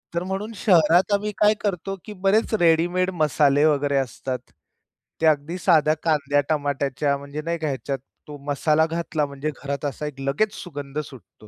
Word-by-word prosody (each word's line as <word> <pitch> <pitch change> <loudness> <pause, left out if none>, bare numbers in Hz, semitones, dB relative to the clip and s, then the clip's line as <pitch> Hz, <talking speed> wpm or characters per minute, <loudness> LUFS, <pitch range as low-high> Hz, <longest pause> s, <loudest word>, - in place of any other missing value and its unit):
तर 170 - 0
म्हणून 210 +4 -3
शहरात 175 -1 +4
आम्ही 210 +1 0
काय 210 0 +5
करतो 195 -1 -2
की 210 - -7
बरेच 215 +3 +2
रेडीमेड 175 +2 +3
मसाले 145 -1 +3
वगैरे 145 -2 +2
असतात. 130 0 -3 0.8
ते - - +2
अगदी 155 +4 +1
साध्या 155 -4 +4
कांद्या, 145 -3 +2
टमाट्याच्या 140 -1 0
म्हणजे 140 +2 -7
नाही 170 0 -1
का 155 - -2
ह्याच्यात 135 -1 -3 0.3
तो 145 -1 -8
मसाला 150 +2 +2
घातला 165 -2 -2
म्हणजे 140 +2 -4
घरात 140 +1 -3
असा 145 +2 -3
एक 135 -2 -8
लगेच 145 +11 0
सुगंध 145 -4 -6
सुटतो. 125 -7 -11
150 Hz, 160 wpm, -23 LUFS, 140-175 Hz, 0.8 s, काय